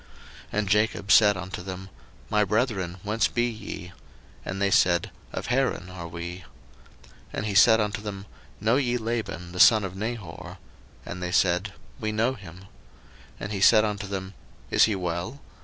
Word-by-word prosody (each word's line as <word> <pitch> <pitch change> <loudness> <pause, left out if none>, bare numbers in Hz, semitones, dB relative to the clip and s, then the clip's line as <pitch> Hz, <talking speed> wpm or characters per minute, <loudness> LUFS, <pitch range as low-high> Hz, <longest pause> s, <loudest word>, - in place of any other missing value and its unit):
01:029:004 - - -24 0.4
And 105 0 0
Jacob 105 0 +1
said 105 -2 +6
unto 90 0 -6
them, 95 +1 -7 0.4
My 105 0 +4
brethren, 105 -4 0
whence 105 +2 +1
be 120 0 0
ye? 110 -6 -7 0.5
And 95 - -4
they 100 0 +1
said, 85 -3 +3 0.2
Of - - -5
Haran 125 -9 0
are 85 -2 -7
we. 85 +1 -6
01:029:005 90 - -14 0.9
And - - -3
he 105 - -2
said 110 +2 +7
unto 105 -1 -1
them, 100 -2 -6 0.3
Know 110 +5 +2
ye 125 -3 +1
Laban 110 -7 -4
the 90 - -7
son 110 +2 +7
of 95 -1 -5
Nahor? 105 -4 -6 0.5
And 90 +1 -6
they 90 0 -3
said, 90 +3 +2 0.3
We 110 -3 -2
know 115 +4 +1
him. 95 -6 -11
01:029:006 - - -15 0.8
And 105 - -4
he 100 -2 -3
said 110 +1 +7
unto 105 -1 -3
them, 95 -1 -5 0.4
Is - - +6
he 110 - 0
well? 90 +8 -3
100 Hz, 175 wpm, -26 LUFS, 90-110 Hz, 0.9 s, said